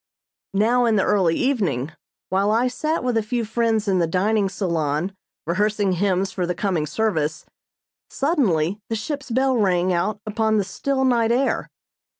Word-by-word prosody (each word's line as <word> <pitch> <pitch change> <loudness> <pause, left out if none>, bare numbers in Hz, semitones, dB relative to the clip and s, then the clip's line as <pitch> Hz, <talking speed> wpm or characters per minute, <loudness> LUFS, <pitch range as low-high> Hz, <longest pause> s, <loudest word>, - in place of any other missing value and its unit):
Now 240 +5 +3
in 225 -2 +2
the 195 - +3
early 185 -5 +2
evening, 175 - 0 0.4
while 195 +2 +1
I 230 +4 +2
sat 310 +4 -2
with 250 -2 0
a - - +3
few 230 +2 -2
friends 225 -1 0
in 190 -2 +2
the 170 - +2
dining 195 +4 +1
salon 170 -2 -1 0.3
rehearsing 205 +3 +1
hymns 190 +1 0
for 180 -3 -2
the 180 - -2
coming 175 -7 -1
service, 160 -4 -1 0.6
suddenly 210 - 0
the 225 - -1
ship's 275 +5 -5
bell 260 +2 +2
rang 185 -4 +2
out 190 +5 -1
upon 220 0 +1
the 205 - +2
still 265 +7 -1
night 235 -3 +2
air. 260 +3 0
210 Hz, 160 wpm, -22 LUFS, 180-235 Hz, 0.6 s, Now